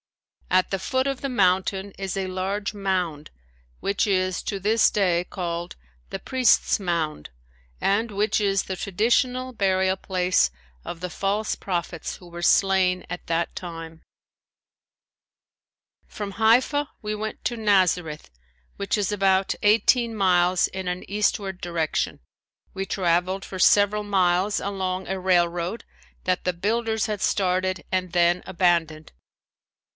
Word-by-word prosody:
At 185 0 +2
the 195 - -1
foot 260 +7 0
of 275 -2 -3
the 275 - -2
mountain 190 -2 +1
is 195 -1 -4
a 190 - -1
large 195 +3 -3
mound 185 -7 -2 0.5
which 200 +2 0
is 185 -2 0
to 200 - -3
this 215 +4 +3
day 180 -4 +1
called 175 -2 -4 0.3
the - - -5
"Priest's 255 -3 +3
Mound" 165 - -2 0.5
and 220 +4 +1
which 210 +1 +1
is 195 -1 +1
the 190 - -4
traditional 245 +7 0
burial 190 -3 +1
place 185 - +1 0.3
of 170 - -7
the 180 +1 -4
false 200 +5 -1
prophets 175 -3 -4
who 180 - -14
were 170 0 -8
slain 185 0 +3
at 180 0 -7
that 165 +1 -1
time. 165 -2 -8 2.1
From 205 -2 -6
Haifa 250 +7 +3
we 215 0 -3
went 215 +1 -6
to 240 - 0
Nazareth 180 - +1 0.5
which 200 +2 -1
is 205 -1 0
about 195 -1 +2
eighteen 230 +3 +3
miles 180 -2 +3
in 190 -1 -6
an 180 0 -4
eastward 200 -2 -1
direction. 170 -3 -2 0.5
We 195 0 -3
traveled 185 +1 0
for 190 - -7
several 205 +2 +4
miles 190 0 +2
along 190 -2 -3
a 190 0 -3
railroad 175 +2 0 0.4
that 185 0 0
the 180 - 0
builders 220 +4 0
had 210 -3 -3
started 185 -2 0
and 185 -1 -1
then 175 0 +2
abandoned. 170 -4 0
190 Hz, 135 wpm, -24 LUFS, 180-205 Hz, 2.1 s, several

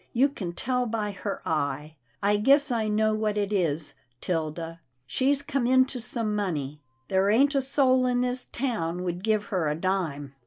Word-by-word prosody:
You 265 +4 +4
can 185 -10 -5
tell 250 +5 -1
by 215 -2 -2
her 200 0 -5
eye. 150 0 -2 0.3
I 205 +1 +3
guess 280 +6 +4
I 225 -2 0
know 215 +1 +2
what 215 -1 -1
it 205 0 0
is, 160 -5 0 0.3
'Tilda; 165 0 -3 0.3
she's 275 - +1
come 275 -3 -1
into 260 0 +3
some 225 -3 -2
money. 150 -8 -3 0.3
There 190 +1 +2
ain't 275 +7 +4
a 275 - +2
soul 260 -1 +3
in 245 0 +1
this 250 0 -1
town 180 -9 -2
would 175 0 -3
give 215 -1 +2
her 175 -5 +1
a 150 - 0
dime." 160 -6 -2
210 Hz, 180 wpm, -27 LUFS, 170-250 Hz, 0.3 s, You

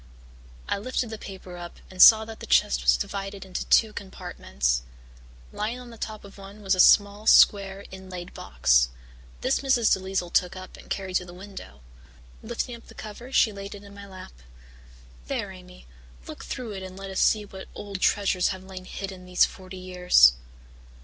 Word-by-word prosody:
I - - -1
lifted 245 +1 -3
the 220 - -6
paper 185 -2 -9
up 175 0 -9
and 185 -1 -1
saw 220 -1 +9
that 225 0 -10
the - - -9
chest 65 -1 +3
was - - +4
divided 195 - -5
into 185 -1 -5
two 220 -2 +4
compartments. 65 - -3 0.7
Lying 230 +4 -3
on 245 -1 -11
the - - -11
top 215 -1 -6
of 200 0 -14
one 200 +2 -12
was 195 0 +2
a 185 - -1
small, 205 +3 +5
square, 200 -2 +5
inlaid 185 -2 -9
box. - - +2 0.5
This - - +1
Mrs. 260 -5 +3
DeLisle 190 -2 -3
took 180 +1 +2
up 185 0 -10
and - - -15
carried 190 -2 -1
to 180 - -5
the 175 0 -12
window. 185 - -11 0.6
Lifting 235 +2 -4
up 235 - -16
the - - -15
cover 225 +4 -9
she 235 -4 +4
laid 200 0 -8
it 205 - -12
in 200 0 -13
my 200 0 -11
lap. 185 - -11 0.9
"There, - - -3
Amy, - - -14 0.4
look - - -9
through 245 -4 -5
it 195 -2 -6
and 185 0 -9
let 195 0 -7
us 190 - -2
see 215 -1 +3
what 190 -1 -10
old 200 -2 -7
treasures 195 -3 +2
have 190 -1 -4
lain 190 -1 -10
hidden 195 0 -7
there - - -15
these 180 0 +4
forty 190 0 -10
years." 180 - +5
195 Hz, 190 wpm, -26 LUFS, 180-205 Hz, 0.9 s, saw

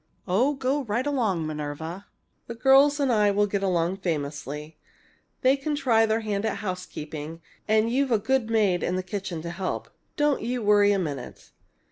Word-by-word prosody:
"Oh, 245 +11 +2
go 270 +2 0
right 235 +4 -1
along, 220 - 0
Minerva! 155 +5 -5 0.4
The 235 - -6
girls 275 +4 +5
and 270 -4 +2
I 210 -2 +4
will 205 +1 +2
get 200 -1 -2
on 180 -1 +1
famously. 150 -3 -4 0.6
They 260 +1 +5
can 295 +2 -2
try 235 -6 +3
their 220 +1 +1
hand 210 -2 -2
at 220 - -1
housekeeping, 165 -5 -6 0.3
and 220 +1 +3
you've 270 +1 +1
a 225 - +5
good 225 +2 0
maid 205 -6 +2
in 180 - -1
the 185 - -2
kitchen 185 -4 -5
to 170 - -4
help. 185 +2 -4 0.3
Don't 295 -2 +2
you 240 +1 -2
worry 205 0 +5
a 200 - +2
minute!" 145 -9 -5
205 Hz, 175 wpm, -26 LUFS, 170-245 Hz, 0.6 s, girls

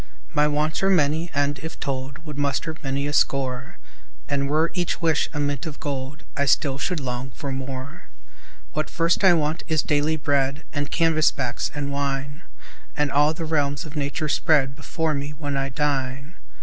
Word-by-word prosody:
My 150 0 +4
wants 150 +2 0
are 195 - +3
many 160 -1 +3
and, 140 0 0
if 160 +3 -7
told, 135 +2 -4
Would 150 -2 -6
muster 145 +3 -1
many 140 -1 -1
a 145 - -2
score; 130 -3 +1 0.5
And 140 -2 0
were 155 +3 +2
each 175 -2 -1
wish 165 -2 +2
a 150 - -3
mint 145 0 -1
of 150 -2 -7
gold, 140 0 -4
I 140 - +1
still 140 -1 +2
should 180 0 -1
long 125 -1 -3
for 140 0 -5
more. 130 +1 -5 0.7
What 155 - -1
first 170 +3 +1
I 190 -2 +8
want 155 -1 +1
is 155 -2 +2
daily 150 +1 +2
bread 140 0 +1
And 145 -1 -1
canvas 165 -2 +4
backs, 125 -4 -2
and 140 -1 -2
wine 140 +1 -2 0.6
And 150 -2 +1
all 150 +2 +4
the 165 - -4
realms 145 0 0
of 155 0 -10
nature 150 +1 -1
spread 140 -3 +3
Before 155 +1 -1
me, 145 +1 -3
when 145 -1 -3
I 135 0 0
dine. 135 +1 -1
145 Hz, 180 wpm, -24 LUFS, 140-155 Hz, 0.7 s, I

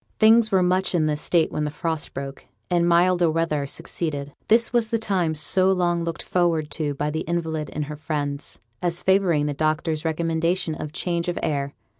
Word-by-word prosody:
Things 220 0 +5
were 190 -2 +4
much 185 +1 +2
in 160 -3 +2
this 150 -1 -1
state 170 -3 +2
when 150 - -2
the 150 - -1
frost 160 +1 -4
broke, 135 0 -7 0.2
and 175 -1 +3
milder 175 0 +4
weather 155 -3 0
succeeded. 145 -3 -4
This 230 +2 +3
was 235 -2 +2
the 230 - +1
time 185 -7 0
so 185 +5 +3
long 175 -2 +1
looked 165 0 -4
forward 170 -4 0
to 150 -3 -2
by 150 +2 -2
the 160 - -2
invalid 160 -3 -2
and 150 0 -3
her 150 +1 -6
friends, 145 -2 -4 0.2
as 175 -1 -1
favouring 185 -6 +2
the 145 - -1
doctor's 155 +1 -1
recommendation 165 +1 0
of 155 -1 -6
change 170 +1 -2
of 175 - -2
air. 140 -2 -2
165 Hz, 190 wpm, -23 LUFS, 150-180 Hz, 0.2 s, Things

